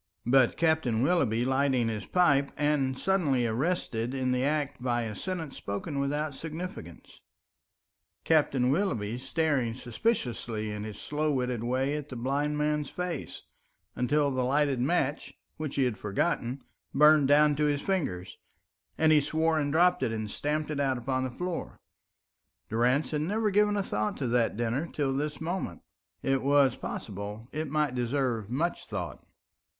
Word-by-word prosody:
But 130 0 +4
Captain 160 -8 +2
Willoughby 130 -8 +2
lighting 130 -2 +2
his 110 -3 -4
pipe 140 -6 +3
and 145 -3 +1
suddenly 150 -10 +1
arrested 120 -1 -1
in 130 -1 0
the 125 0 +1
act 145 -2 -1
by 120 -1 0
a 110 -2 -4
sentence 170 - -5
spoken 140 +9 -4
without 145 +2 -1
significance, 165 +7 -8 1.0
Captain 135 -5 +3
Willoughby 125 - -1
staring 135 -4 0
suspiciously 120 - -2
in 105 0 -5
his 105 -1 -7
slow 150 +1 -1
witted 125 -4 -1
way 130 +4 0
at 150 -1 -5
the 130 - -7
blind 140 +5 -1
man's 150 -1 0
face, 180 -4 -5 0.5
until 145 +3 +2
the 130 -1 0
lighted 140 0 +2
match, 145 0 0 0.2
which 155 -3 -4
he 140 - +2
had 120 -6 -1
forgotten, 120 +4 -1 0.3
burnt 150 -1 +6
down 150 +1 +5
to 150 - +2
his 145 -1 +1
fingers, 140 - -2 0.6
and 160 0 +4
he 150 -1 +6
swore 160 +2 +1
and 145 -1 -1
dropped 180 +3 +4
it - - 0
and 110 -2 -4
stamped 150 +1 -2
it 145 - -2
out 135 -2 +1
upon 130 +1 -1
the 130 - -2
floor. 175 +7 -5 0.9
Durrance 125 +6 +2
had 150 -1 0
never 210 +6 0
given 210 +1 +3
a 200 - +1
thought 105 - -2
to 135 - -2
that 115 -3 +1
dinner 120 +7 -1
till 140 -3 -1
this 145 +1 -2
moment. 165 - -3 0.4
It 135 0 +1
was 140 -2 +4
possible 105 +3 -6
it 155 -1 -3
might 150 -2 +1
deserve 120 -3 -1
much 160 +8 -2
thought. 90 - -5
140 Hz, 155 wpm, -29 LUFS, 120-155 Hz, 1.0 s, burnt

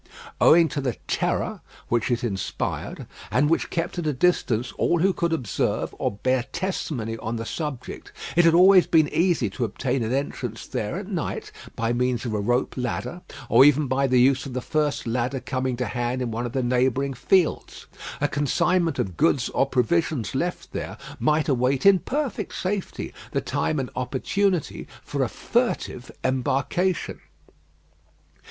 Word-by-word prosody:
Owing 165 0 +7
to 145 - -3
the 125 -4 -1
terror - - -1 0.3
which 120 0 0
it 120 -1 0
inspired, 100 -6 -3 0.2
and 145 +8 +2
which 165 - +1
kept 170 0 -2
at 165 - -2
a 150 - +1
distance 125 -6 +1
all 175 - +3
who 190 +1 +3
could 170 -1 -1
observe 130 -10 -1
or - - +1
bear 130 +5 0
testimony 125 - -3
on 110 +2 -3
the 115 0 -4
subject, 150 -2 -5 0.2
it 175 - +6
had 165 -1 +5
always 185 +1 +7
been 160 -2 +4
easy 170 - +2
to 125 - -3
obtain 125 +4 -1
an 110 0 -1
entrance 130 -4 -3
there 105 +6 -3
at 195 0 -6
night 180 -7 -4 0.2
by 115 +1 0
means 125 0 0
of 115 - -2
a 105 - 0
rope 120 +5 0
ladder, 125 +6 -3 0.3
or - - +7
even 145 +1 +5
by 135 +1 +1
the 125 -1 +3
use 135 +3 +3
of 130 - -7
the 130 - -1
first 150 +2 -1
ladder 125 +3 -1
coming 130 -1 -2
to 125 - -1
hand 120 +2 -2
in 125 -2 -2
one 120 +2 -2
of 120 - -9
the 130 -2 0
neighbouring 130 +2 +1
fields. 175 +7 +1 0.3
A 145 - +2
consignment 160 +3 +1
of 90 -4 -2
goods 145 -6 +2
or 135 - +1
provisions 135 -2 0
left 175 +7 -3
there - - -5 0.2
might 155 0 +2
await 130 +1 +1
in 195 -2 +7
perfect 265 - -3
safety 190 +1 -3 0.2
the - - +2
time 155 - -1
and 130 - -4
opportunity 170 +7 -1 0.2
for - - -3
a - - +1
furtive - - -1
embarkation. 135 +8 0
135 Hz, 170 wpm, -24 LUFS, 120-165 Hz, 0.3 s, Owing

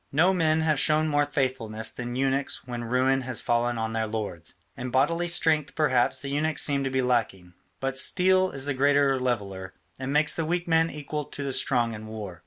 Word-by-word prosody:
No 170 +7 +3
men 160 -3 +2
have 155 -3 +1
shown 155 +1 +3
more 145 -1 +2
faithfulness 120 -6 -2
than 120 0 -6
eunuchs 135 +1 -1
when 120 -1 -5
ruin 130 +3 +1
has 130 -2 -3
fallen 120 0 0
on 110 0 -3
their 110 0 -1
lords. 105 -7 -5 0.2
In 125 +1 -5
bodily 150 +7 +1
strength, 160 -3 +1
perhaps, 130 -4 +2
the 140 +1 -5
eunuchs 155 +3 0
seem 140 -2 +1
to 135 - -1
be 130 0 0
lacking, 105 -8 -1 0.3
but 135 0 -2
steel 185 +3 +3
is 135 -2 0
a 145 - +1
great 140 +2 +2
leveller, 120 -9 -1 0.2
and 130 +1 -4
makes 150 +1 +3
the 165 - -2
weak 175 +2 -2
man 165 0 +3
equal 150 0 -5
to 140 - -7
the 135 -1 -2
strong 120 -2 +2
in 110 0 -8
war. 105 -6 -8
135 Hz, 200 wpm, -26 LUFS, 120-150 Hz, 0.3 s, No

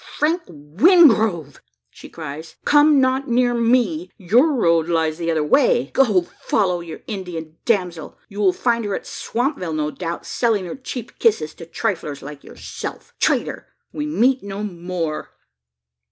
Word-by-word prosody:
"Frank 325 +4 +1
Wingrove!" 190 - +3 0.3
she - - -13
cries, 160 0 -8
"come 295 0 +5
not 260 +1 +1
near 245 0 +2
me. 230 -8 +1
Your 240 - +3
road 170 - +2
lies 160 -1 0
the 170 -1 -2
other 160 -2 +1
way. 475 - +2
Go! 210 -9 +3 0.2
follow 185 -4 +1
your 165 -2 -9
Indian 170 -6 -6
damsel. 180 -8 -1
You 205 -1 -9
will 195 -3 +4
find 235 +3 0
her 205 -2 -2
at - - -6
Swampville, 235 - -3
no 150 -1 -1
doubt, 170 0 -5
selling 220 -6 0
her 170 - -6
cheap 255 -3 -8
kisses 205 -10 +2
to 165 - -11
triflers 170 -7 -3
like 145 0 -9
yourself. - - -8
Traitor! - - 0 0.3
we 300 0 -3
meet 260 -2 +2
no 200 +1 -6
more!" 175 -5 -4
195 Hz, 150 wpm, -21 LUFS, 165-245 Hz, 0.3 s, come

